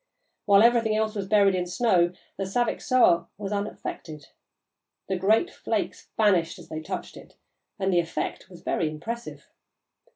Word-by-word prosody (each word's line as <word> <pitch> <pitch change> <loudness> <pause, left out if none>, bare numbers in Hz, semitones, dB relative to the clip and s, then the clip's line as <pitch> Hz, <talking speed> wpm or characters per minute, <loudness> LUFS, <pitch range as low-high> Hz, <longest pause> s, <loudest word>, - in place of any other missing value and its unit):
While 200 0 +6
everything 230 -2 +4
else 215 0 0
was 200 -3 -4
buried 200 -1 +4
in 180 -1 -1
snow, 180 -3 +2 0.2
the 195 - -3
Saviksoah 240 -2 +2
was 200 -1 -5
unaffected. 170 -7 -5 0.8
The 190 - -1
great 215 - +2
flakes - - -3
vanished 185 -7 +2
as - - -14
they 155 0 -5
touched - - -6
it, - - -14 0.4
and 190 -2 0
the 175 - +4
effect 165 -1 -3
was 175 -2 -14
very 160 - 0
impressive. 230 +10 -7
195 Hz, 150 wpm, -26 LUFS, 175-220 Hz, 0.8 s, While